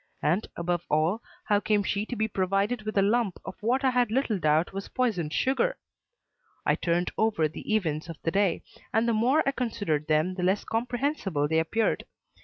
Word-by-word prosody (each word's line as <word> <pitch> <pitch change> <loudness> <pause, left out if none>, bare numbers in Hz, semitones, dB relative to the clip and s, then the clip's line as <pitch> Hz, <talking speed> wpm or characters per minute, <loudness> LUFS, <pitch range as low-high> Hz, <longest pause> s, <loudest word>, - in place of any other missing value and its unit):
And, 180 +8 +1
above 175 0 -1
all, 160 +9 +2 0.2
how 205 -1 +3
came 210 0 +1
she 205 +2 -1
to 245 - -4
be 220 0 0
provided 195 +3 0
with 215 - -2
a 195 - +5
lump 215 -2 +1
of - - -5
what 250 +5 +1
I 260 - +4
had 245 -2 +2
little 225 -3 0
doubt 155 +2 +2
was 195 +1 -5
poisoned 210 -12 0
sugar? 375 - +1 0.9
I - - +4
turned 175 +1 0
over 210 -8 +2
the 155 - -7
events 165 -5 -1
of 165 - -6
the 165 - 0
day, 195 -1 +1 0.3
and 225 +2 +2
the 235 - +2
more 250 +8 +3
I - - +4
considered 205 - -2
them 155 +4 +2
the 185 - -5
less 190 +3 +1
comprehensible 235 - -1
they 160 +1 +2
appeared. 220 +8 0
205 Hz, 195 wpm, -27 LUFS, 170-230 Hz, 0.9 s, a